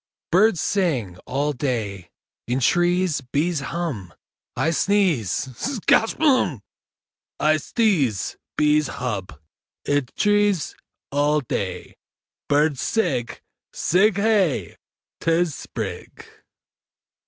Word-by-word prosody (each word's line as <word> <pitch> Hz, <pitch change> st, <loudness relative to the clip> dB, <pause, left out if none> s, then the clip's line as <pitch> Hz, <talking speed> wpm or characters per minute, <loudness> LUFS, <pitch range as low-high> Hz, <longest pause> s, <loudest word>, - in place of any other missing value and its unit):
Birds 195 Hz, +1 st, +4 dB
sing 135 Hz, -, -1 dB
All 145 Hz, +4 st, 0 dB
day. 110 Hz, -, -3 dB, 0.4 s
In 125 Hz, +2 st, 0 dB
trees 175 Hz, +3 st, +2 dB
Bees 160 Hz, +2 st, +1 dB
hum 135 Hz, -, -4 dB, 0.4 s
I 160 Hz, -, +1 dB
sneeze 175 Hz, -, +2 dB, 0.3 s
Skatch 225 Hz, -, +1 dB
Humb!! 255 Hz, -, +2 dB, 0.8 s
I 155 Hz, +1 st, +3 dB
sdeeze. 155 Hz, -, 0 dB, 0.2 s
Bees 150 Hz, -1 st, +3 dB
hub. 100 Hz, -, -5 dB, 0.5 s
Id 145 Hz, -3 st, 0 dB
trees 205 Hz, -5 st, +2 dB, 0.4 s
All 145 Hz, +2 st, +2 dB
day 130 Hz, -, -4 dB, 0.5 s
Birds 145 Hz, -1 st, +2 dB
sig. 145 Hz, -, -1 dB, 0.3 s
Sig 195 Hz, +4 st, +3 dB
Hey! 195 Hz, -, +1 dB, 0.4 s
'Tis 165 Hz, -1 st, +1 dB
Sprig! -, -, -7 dB
150 Hz, 90 wpm, -23 LUFS, 125-185 Hz, 0.8 s, Birds